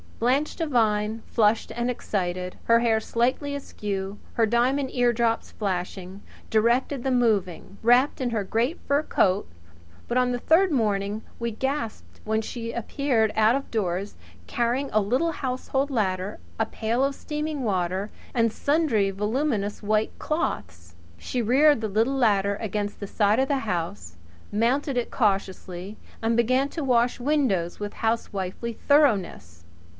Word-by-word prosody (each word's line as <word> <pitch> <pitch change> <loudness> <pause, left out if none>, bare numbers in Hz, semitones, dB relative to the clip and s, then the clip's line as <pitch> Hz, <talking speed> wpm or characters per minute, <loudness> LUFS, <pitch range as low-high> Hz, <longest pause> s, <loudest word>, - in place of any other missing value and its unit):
Blanche 260 +6 +1
Devine, 225 -8 +1
flushed 220 -1 +2
and 240 +1 -2
excited, 185 -6 -3
her 230 0 +5
hair 230 -2 +2
slightly 255 +6 0
askew, 200 -7 -4 0.2
her 230 - +3
diamond 255 +4 +1
eardrops 235 -2 +1
flashing, 190 -1 -4 0.3
directed 240 +4 +2
the 270 - 0
moving, 205 -6 0
wrapped 245 +5 +4
in 250 - 0
her 220 -3 -1
great 235 - -1
fur 285 +1 +3
coat; 195 -9 +1 0.6
but 240 - 0
on 250 0 +2
the 245 - -1
third 345 +7 +4
morning 210 -4 0 0.2
we 235 0 -1
gasped 265 0 -4
when 220 0 0
she 230 +1 -5
appeared 235 -2 0
out 220 +2 +4
of 275 - -4
doors, 195 -2 -2 0.3
carrying 245 +4 0
a 215 - +3
little 255 +12 +1
household 265 +1 -2
ladder, 195 -5 -1 0.2
a 225 - +1
pail 230 +4 -1
of 275 0 0
steaming 300 -1 -4
water 190 -1 -1 0.2
and 230 -2 +2
sundry 280 -8 +1
voluminous 210 +1 -1
white 215 +1 0
cloths. 85 - -3 0.2
She 250 - -3
reared 275 +3 +4
the 220 - -1
little 225 +6 +1
ladder 200 -5 +2
against 205 -1 -3
the 200 - -5
side 210 +3 +2
of 265 - +2
the 275 -1 +1
house 100 - -4 0.3
mounted 250 +5 +1
it 245 - -1
cautiously, 195 -2 -1 0.3
and 225 +1 +2
began 255 +4 +2
to 315 +1 -4
wash 245 -2 +2
windows: 245 - 0
with 205 0 -4
housewifely 225 -1 -2
thoroughness. 195 - +1
225 Hz, 145 wpm, -25 LUFS, 200-260 Hz, 0.6 s, her